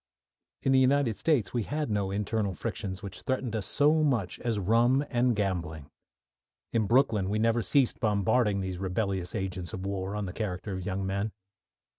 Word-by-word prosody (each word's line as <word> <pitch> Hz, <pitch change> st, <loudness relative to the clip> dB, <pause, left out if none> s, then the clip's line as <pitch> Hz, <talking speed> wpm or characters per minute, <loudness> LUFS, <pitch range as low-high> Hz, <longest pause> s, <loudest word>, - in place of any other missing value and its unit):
In 135 Hz, -, +2 dB
the 135 Hz, -, +6 dB
United 130 Hz, -3 st, +3 dB
States 145 Hz, -7 st, +1 dB
we 120 Hz, -, +1 dB
had 145 Hz, +3 st, -2 dB
no 100 Hz, -2 st, 0 dB
internal 100 Hz, 0 st, -1 dB
frictions 95 Hz, +3 st, -4 dB
which 100 Hz, -, -6 dB
threatened 130 Hz, -3 st, -2 dB
us 105 Hz, -5 st, -1 dB
so 150 Hz, +2 st, +3 dB
much 120 Hz, -, 0 dB
as 115 Hz, -3 st, -1 dB
rum 120 Hz, +8 st, +3 dB
and 120 Hz, -1 st, +2 dB
gambling. 85 Hz, -7 st, -3 dB, 0.8 s
In 110 Hz, -3 st, +2 dB
Brooklyn 115 Hz, -6 st, +3 dB
we 105 Hz, -, 0 dB
never 115 Hz, +1 st, +2 dB
ceased 130 Hz, +5 st, +2 dB
bombarding 105 Hz, -1 st, +2 dB
these 95 Hz, -1 st, -4 dB
rebellious 95 Hz, 0 st, -2 dB
agents 90 Hz, -4 st, -4 dB
of 95 Hz, -, -5 dB
war 100 Hz, 0 st, -3 dB
on 105 Hz, -1 st, -2 dB
the 90 Hz, -, -6 dB
character 100 Hz, -2 st, -4 dB
of 95 Hz, -1 st, -5 dB
young 95 Hz, 0 st, -2 dB
men. 100 Hz, +2 st, -2 dB
105 Hz, 175 wpm, -29 LUFS, 95-120 Hz, 0.8 s, the